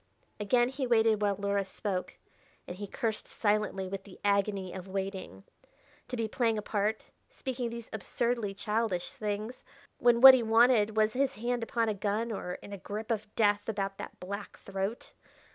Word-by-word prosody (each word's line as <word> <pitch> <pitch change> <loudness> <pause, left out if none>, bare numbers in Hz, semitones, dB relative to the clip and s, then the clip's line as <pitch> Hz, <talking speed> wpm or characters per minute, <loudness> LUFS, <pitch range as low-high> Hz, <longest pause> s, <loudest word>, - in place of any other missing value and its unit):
Again 240 +4 +3
he 265 0 -3
waited 225 -2 +3
while 205 -1 +2
Luhra 200 0 0
spoke, 190 -1 -4 0.5
and 175 - -6
he 205 +1 -5
cursed 220 +2 -2
silently 205 -3 0
with 195 +1 -5
the 195 -2 -14
agony 200 -2 +1
of 185 0 -7
waiting. 190 - -5 0.6
To 250 - -4
be 225 -1 0
playing 225 0 +1
a 210 - -3
part, 210 +1 -1 0.2
speaking 260 - -4
these 235 -1 -7
absurdly 220 -1 -1
childish 210 -3 -1
things, 215 +3 -4 0.4
when 240 -1 +4
what 265 +1 +12
he 260 - +4
wanted 225 -1 +4
was 215 0 +3
his 270 +1 +1
hand 240 +3 -1
upon 230 0 0
a 215 - +1
gun 210 +3 -1
or 180 -4 -4
in 200 - -9
a 200 - -6
grip 215 +4 -5
of 215 -2 -1
death 205 -1 +2
about 195 -2 -2
that - - -8
black 200 +3 -6
throat! 195 +4 -4
215 Hz, 175 wpm, -30 LUFS, 200-230 Hz, 0.6 s, what